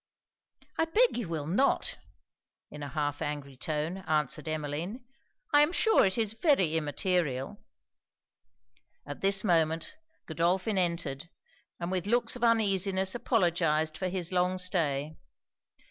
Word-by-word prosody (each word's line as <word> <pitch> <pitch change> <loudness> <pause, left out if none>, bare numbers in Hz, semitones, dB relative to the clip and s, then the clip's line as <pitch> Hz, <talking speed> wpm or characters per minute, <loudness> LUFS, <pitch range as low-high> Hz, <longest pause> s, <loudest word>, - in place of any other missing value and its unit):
'I 325 - +4
beg 455 +10 +3
you 235 -8 -3
will 155 -3 -3
not,' 205 - +1 0.7
in 150 - -9
an 145 - -5
half 145 0 -2
angry 145 -2 -4
tone, 155 +6 -3
answered 150 -1 0
Emmeline 155 - -4 0.5
'I 290 - +7
am 295 +2 +3
sure 445 +4 +4
it 190 +2 +1
is 220 -2 0
very 225 - +2
immaterial.' 150 -3 -1 1.5
At 145 - -8
this 195 0 +2
moment 165 - +1 0.3
Godolphin 180 +5 0
entered; 170 -4 -1 0.5
and 170 +1 -3
with 185 0 -2
looks 240 +3 +1
of 245 - -6
uneasiness 195 -4 +2
apologized 170 - +1
for 185 - -2
his 180 -2 -2
long 180 0 +1
stay. 155 -5 -1
175 Hz, 130 wpm, -29 LUFS, 155-200 Hz, 1.5 s, I